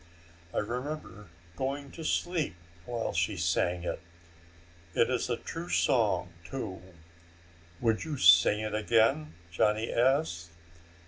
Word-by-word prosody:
I - - -5
remember 120 - -4 0.3
going 140 +4 -3
to 165 - -8
sleep 165 - -1 0.3
while 120 -2 -2
she 105 -3 0
sang 90 0 0
it. - - -3 1.0
It 115 - +3
is 125 -1 -1
a 120 - 0
true 170 +7 -7
song, 105 -10 +2
too." 95 -5 -6 1.0
"Would 115 -2 +1
you 155 -3 -4
sing 90 +3 +6
it 110 -1 -3
again?" 110 -8 +2 0.2
Johnny 105 +6 +1
asked. 120 - +1
115 Hz, 120 wpm, -30 LUFS, 95-135 Hz, 1.0 s, sing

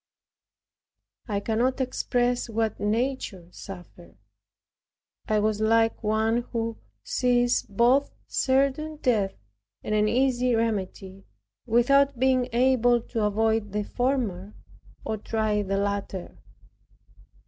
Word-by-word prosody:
I 205 -3 -1
cannot 240 +5 0
express 245 -1 0
what 220 -1 -1
nature 215 -4 -2
suffered. 180 -2 -11 1.1
I 215 - +2
was 210 0 0
like 225 +1 +2
one 220 +2 +1
who 230 -1 -3 0.2
sees 245 -1 +2
both 240 +7 +3
certain 275 +4 0
death 220 -9 0 0.5
and - - -3
an 210 0 +3
easy 250 0 +2
remedy, 195 -3 -3 0.4
without 275 +4 +3
being 255 0 +2
able 245 0 +3
to 230 0 -4
avoid 220 0 0
the 210 0 -1
former, 215 -6 -2 0.5
or 220 - -2
try 215 0 -1
the 195 0 -2
latter. 200 -2 -3
225 Hz, 105 wpm, -26 LUFS, 210-250 Hz, 1.1 s, both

